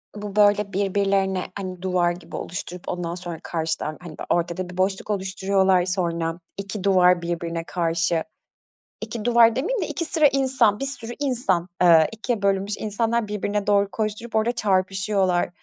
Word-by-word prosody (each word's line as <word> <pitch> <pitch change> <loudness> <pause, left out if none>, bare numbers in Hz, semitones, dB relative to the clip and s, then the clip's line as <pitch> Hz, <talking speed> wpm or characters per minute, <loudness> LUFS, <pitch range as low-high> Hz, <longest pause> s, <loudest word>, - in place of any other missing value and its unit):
Bu, 205 -1 -6
böyle 205 -1 +3
birbirlerine, 195 -1 0
hani 185 -2 -6
duvar 180 -2 +1
gibi 175 -1 -9
oluşturup, 180 0 -6
ondan 175 -1 -3
sonra 175 -3 -7
karşıdan, 160 -2 -3
hani 175 - -8
böyle, - - -6
ortada 175 +1 -1
bir 180 - -10
boşluk 190 +2 0
oluşturuyorlar, 190 -2 +1
sonra, 170 -2 -1 0.2
2 200 0 -5
duvar 180 -2 +4
birbirine 170 -1 -3
karşı, 165 -1 0 0.8
2 225 -2 -5
duvar 235 -1 +5
demeyeyim 420 - -1
de, 330 - -1
2 305 +2 -3
sıra 310 -1 +4
insan, 260 -6 +2
bir 275 - -2
sürü 250 -4 -6
insan, 235 -11 0
eee, 165 -3 +7
ikiye 225 0 -3
bölünmüş 200 +1 +1
insanlar 225 +1 0
birbirine 205 0 -2
doğru 200 -1 +3
koşturup 215 +3 -3
orada 220 +2 +2
çarpışıyorlar. 190 -3 +1
195 Hz, 155 wpm, -23 LUFS, 180-215 Hz, 0.8 s, eee